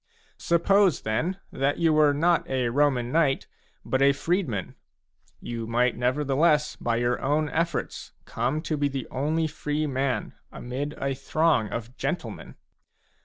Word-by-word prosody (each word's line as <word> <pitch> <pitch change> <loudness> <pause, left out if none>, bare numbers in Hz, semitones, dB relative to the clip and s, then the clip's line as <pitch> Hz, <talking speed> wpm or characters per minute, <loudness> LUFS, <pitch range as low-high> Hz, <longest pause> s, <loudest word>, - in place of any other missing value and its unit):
6 - - -13
Suppose, 180 0 +3
then, 160 - -1
that 140 +2 0
you 165 -2 +3
were 150 -1 +5
not 165 +4 +1
a 130 -2 0
Roman 130 -2 +1
knight, 145 -4 +2
<^ - - -37
but 130 - 0
a 140 0 +6
freedman, 140 - -2 0.7
you 115 -1 -5
might 120 +1 +1
nevertheless 145 +4 +2
by 120 -1 -1
your 120 +1 0
own 150 +2 +1
efforts 165 0 -2
come 130 +7 -2
to 155 - -2
be 145 0 +1
the 135 -3 -4
only 155 +5 0
free 150 0 -2
man 135 -2 -1 0.2
amid 135 +4 -5
a 140 0 -1
throng 140 -3 +1
of 115 +2 -6
gentlemen. - - -4
140 Hz, 150 wpm, -26 LUFS, 125-155 Hz, 0.7 s, a